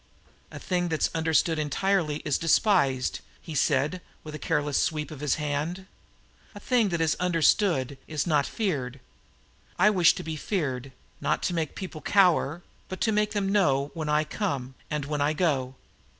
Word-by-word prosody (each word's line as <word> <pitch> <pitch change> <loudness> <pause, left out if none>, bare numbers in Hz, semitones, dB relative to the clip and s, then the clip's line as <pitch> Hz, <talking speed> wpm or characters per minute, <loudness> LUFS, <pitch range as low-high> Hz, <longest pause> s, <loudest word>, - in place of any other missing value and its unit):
"A - - -9
thing 180 -1 -1
that's 160 -2 0
understood 160 0 +1
entirely 155 0 0
is 145 -3 +1
despised," 165 - +2 0.2
he 160 - -9
said, 150 +4 +1 0.2
with 155 - -8
a 150 - -6
careless 150 -3 0
sweep 150 -2 -2
of 150 - -8
his 145 -2 +1
hand. 150 +5 -3 0.7
"A - - -7
thing 230 -1 +2
that 170 -2 -1
is 160 -1 +2
understood 165 - +2
is 155 -2 -2
not 150 -5 +2
feared. 140 - -2 0.8
I 210 - +5
wish 180 -5 +5
to - - -6
be 160 -1 -5
feared, 135 - -3 0.3
not - - 0
to 180 - 0
make 160 -3 -2
people 180 -5 -7
cower, 175 -4 +3 0.3
but 185 - -6
to 220 - +2
make 210 0 +1
them 200 -2 0
know 140 -8 +2
when 155 -3 -4
I 150 +1 +3
come, 140 -7 -3 0.2
and 150 -2 -2
when 145 0 -2
I 145 +2 +2
go. 140 -6 0
155 Hz, 170 wpm, -27 LUFS, 145-180 Hz, 0.8 s, I